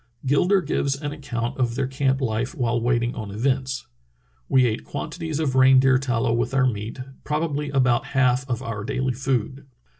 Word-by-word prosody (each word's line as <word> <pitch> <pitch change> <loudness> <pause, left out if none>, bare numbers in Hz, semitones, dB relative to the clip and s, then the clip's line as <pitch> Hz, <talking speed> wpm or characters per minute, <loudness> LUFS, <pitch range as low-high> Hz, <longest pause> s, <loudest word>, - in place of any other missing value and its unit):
Gilder 180 +8 +3
gives 140 -2 -1
an 145 -1 -4
account 135 -4 -4
of 120 -2 0
their 135 +1 0
camp 135 +1 0
life 120 +2 -1
while 120 -4 0
wait 120 0 +1
ing 120 - -1
on 110 -3 -6
events. 130 +3 -1 0.6
"We 130 -1 +5
ate 110 -2 -1
quantities 160 +1 -5
of 150 -5 0
reindeer 130 0 +5
tallow 120 -2 0
with 120 +3 -1
our 135 -1 +4
meat, 110 0 -3 0.2
probabl} 150 -1 -2
about 125 -3 +2
half 130 0 +2
of 120 0 -2
our 115 -4 -4
daily 130 +1 -1
food. 130 +1 -2
130 Hz, 175 wpm, -23 LUFS, 120-140 Hz, 0.6 s, We